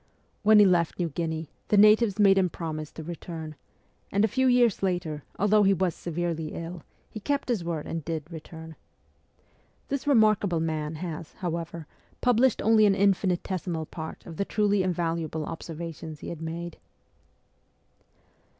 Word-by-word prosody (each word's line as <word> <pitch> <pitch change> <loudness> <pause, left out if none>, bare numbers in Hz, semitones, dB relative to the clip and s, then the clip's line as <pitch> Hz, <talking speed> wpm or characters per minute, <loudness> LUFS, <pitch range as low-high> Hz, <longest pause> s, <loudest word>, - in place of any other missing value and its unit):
When 215 0 +6
he 205 - +8
left 175 -4 +2
New 175 -2 -1
Guinea 160 0 -3 0.2
the 210 - +3
natives 210 0 +6
made 200 -2 +6
him 185 -1 +2
promise 155 -2 -5
to 160 - -7
return; 160 -1 -7 0.6
and 200 +2 +3
a - - +2
few 260 +5 +1
years 245 -4 +4
later, 175 -5 -1 0.2
although 210 +2 +4
he 195 -1 +4
was 185 -1 0
severely 165 -2 -3
ill, 170 +1 -6 0.3
he 215 - -8
kept 280 +5 -2
his 225 -8 0
word 165 -3 -3
and 165 -1 -4
did 160 0 -3
return. 160 0 -9 1.1
This 280 0 -3
remarkable 215 - +4
man 155 -1 -2
has, 165 -1 -6
however, 170 -3 -4 0.3
published 245 0 +3
only 220 -1 +5
an 195 - +3
infinitesimal 185 -4 0
part 160 0 -8
of 165 -2 -9
the - - +1
truly 205 -1 +1
invaluable 165 -3 -1
observations 165 -1 -7
he - - -6
had 165 -2 -7
made. 165 +1 -5
175 Hz, 150 wpm, -27 LUFS, 160-205 Hz, 1.1 s, he